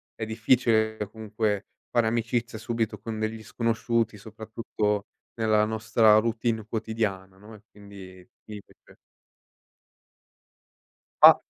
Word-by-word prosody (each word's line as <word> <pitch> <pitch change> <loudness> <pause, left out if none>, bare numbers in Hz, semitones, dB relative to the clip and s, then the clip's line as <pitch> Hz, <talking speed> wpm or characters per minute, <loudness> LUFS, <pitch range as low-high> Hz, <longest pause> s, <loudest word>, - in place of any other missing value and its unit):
è 110 - -4
difficile 110 -1 +2
comunque 110 -1 -2 0.2
fare 115 -2 +2
amicizia 115 0 -1
subito 115 -1 -2
con 110 0 -5
degli 110 0 -3
sconosciuti, 115 -1 -1
soprattutto 110 -1 -3 0.3
nella 110 -2 +2
nostra 110 0 +4
routine 115 -1 0
quotidiana, 105 -4 -3
no 105 +3 -14
e 105 - -13
quindi, 95 -3 -13 0.2
mi 105 -1 -8
fece - - -22 2.3
A - - +12
110 Hz, 105 wpm, -26 LUFS, 105-115 Hz, 2.3 s, A